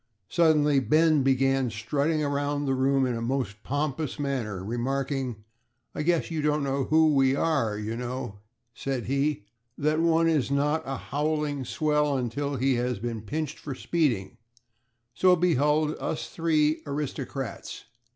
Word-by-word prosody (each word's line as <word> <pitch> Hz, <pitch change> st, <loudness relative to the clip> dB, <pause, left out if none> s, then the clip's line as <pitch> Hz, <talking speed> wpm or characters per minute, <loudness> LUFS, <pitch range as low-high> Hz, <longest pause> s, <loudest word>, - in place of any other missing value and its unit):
Suddenly 150 Hz, -4 st, +4 dB
Ben 155 Hz, +2 st, +3 dB
began 135 Hz, -1 st, +2 dB
strutting 140 Hz, +8 st, -1 dB
around 145 Hz, 0 st, -1 dB
the 135 Hz, -, +1 dB
room 135 Hz, +1 st, +2 dB
in 125 Hz, -, 0 dB
a 115 Hz, -, -3 dB
most 115 Hz, -4 st, -2 dB
pompous 145 Hz, +1 st, -2 dB
manner, 120 Hz, -10 st, -3 dB
remarking, 130 Hz, 0 st, -2 dB, 0.5 s
"I -, -, -3 dB
guess 170 Hz, +2 st, +1 dB
you 160 Hz, -2 st, -1 dB
don't 150 Hz, 0 st, +1 dB
know 135 Hz, -1 st, 0 dB
who 155 Hz, 0 st, +4 dB
we 135 Hz, -1 st, +3 dB
are. 140 Hz, -10 st, +1 dB
You 105 Hz, +2 st, -4 dB
know," 120 Hz, -3 st, -5 dB, 0.3 s
said 130 Hz, 0 st, -3 dB
he, 140 Hz, -3 st, 0 dB, 0.3 s
"that 155 Hz, +2 st, +1 dB
one 165 Hz, 0 st, +3 dB
is 155 Hz, -6 st, +1 dB
not 145 Hz, +3 st, +1 dB
a 135 Hz, 0 st, -3 dB
howling 150 Hz, -1 st, -2 dB
swell 150 Hz, -1 st, +1 dB
until 140 Hz, +4 st, -2 dB
he 135 Hz, +1 st, +2 dB
has 125 Hz, -1 st, -1 dB
been 115 Hz, +1 st, -4 dB
pinched 150 Hz, +7 st, -4 dB
for 140 Hz, -3 st, -6 dB
speeding, 120 Hz, -, -1 dB, 0.8 s
so 180 Hz, +10 st, +5 dB
behold 155 Hz, -2 st, +2 dB
us 155 Hz, -, -3 dB
three 155 Hz, -2 st, +1 dB
aristocrats!" 140 Hz, -3 st, -5 dB
140 Hz, 145 wpm, -27 LUFS, 125-150 Hz, 0.8 s, so